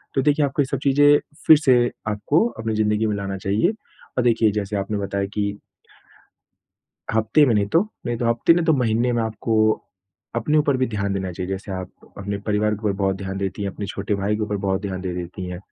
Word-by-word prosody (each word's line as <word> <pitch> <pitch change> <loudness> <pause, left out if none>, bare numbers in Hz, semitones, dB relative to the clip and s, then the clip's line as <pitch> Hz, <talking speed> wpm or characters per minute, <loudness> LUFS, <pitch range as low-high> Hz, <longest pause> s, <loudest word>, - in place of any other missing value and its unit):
तो 135 - +3
देखिए 145 +1 +3
आपको 140 +1 0
ये - - +2
सब 140 - -1
चीज़ें 145 +1 +5 0.3
फिर 155 - +9
से 135 -5 +4 0.3
आपको 125 - +1
अपनी 110 -1 -2
ज़िंदगी 105 0 +1
में 105 - 0
लाना 100 -1 -4
चाहिए। 105 - +1 0.4
और 125 - +2
देखिए, 115 -2 +3
जैसे 105 0 -3
आपने 100 +1 -2
बताया 100 0 -2
कि 100 -1 0 1.6
हफ्ते 110 +7 +4
में 115 - +3
नहीं 100 -1 +2
तो 165 +11 +3 0.3
नहीं 120 -1 -1
तो 120 - -1
हफ्ते, 120 +8 +4
नहीं 175 - +1
तो 160 - +4
महीने 120 -2 +1
में 115 -1 +1
आपको 110 0 -2 0.8
अपने 150 +7 +2
ऊपर 145 -2 +2
भी 130 0 +1
ध्यान 100 -3 -2
देना 95 -1 -2
चाहिए, 90 +2 -5
जैसे 95 +1 -5
आप 95 -1 -5 0.3
अपने 100 0 -3
परिवार 105 0 +1
के 110 +2 -10
ऊपर 100 - +1
बहुत 95 -1 +1
ध्यान 95 0 -5
देती 100 +1 -3
हैं, 100 - -2
अपने 100 - -6
छोटे 100 +1 -3
भाई 100 +2 0
के 110 - -3
ऊपर 105 -1 -1
बहुत 95 0 0
ध्यान 95 -2 -4
दे 95 -1 -3
देती 90 +1 -6
हैं। 90 -1 -6
105 Hz, 220 wpm, -22 LUFS, 100-125 Hz, 1.6 s, फिर